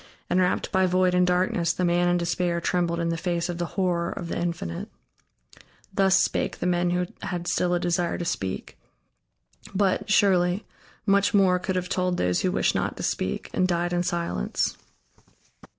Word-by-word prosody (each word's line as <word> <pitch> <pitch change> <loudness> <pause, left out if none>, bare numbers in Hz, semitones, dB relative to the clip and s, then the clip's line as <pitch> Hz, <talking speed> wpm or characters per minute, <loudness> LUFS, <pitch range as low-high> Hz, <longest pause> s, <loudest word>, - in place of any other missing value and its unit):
"and 180 - +3
wrapped 180 0 0
by 190 0 +3
void 185 0 +2
and 180 0 +3
darkness 180 -2 +1
the 180 - -1
man 175 0 +2
in 175 - +3
despair 170 0 0
trembled 170 0 0
in 170 0 0
the 165 - -1
face 170 0 -1
of 175 -1 -4
the 175 - -1
Horror 175 -3 +1
of 170 - -6
the - - -3
Infinite." 170 - -3 1.0
Thus 190 -1 +4
spake - - 0
the - - -4
men 175 0 +1
who 180 +1 0 0.2
had 175 -2 -4
still 180 0 +1
a - - +1
desire 175 0 0
to 175 - -4
speak. 95 - -4 1.0
But, 195 0 +1
surely, 185 -1 +3 0.4
much 200 0 +3
more 185 -2 +4
could 190 +1 -3
have 180 -1 -1
told 180 -1 0
those 90 0 +1
who 185 - +1
wished - - +1
not - - -2
to - - -5
speak, - - -2
and 185 - +2
died 175 0 0
in 175 - +1
silence. 170 - -1
180 Hz, 180 wpm, -25 LUFS, 170-185 Hz, 1.0 s, Thus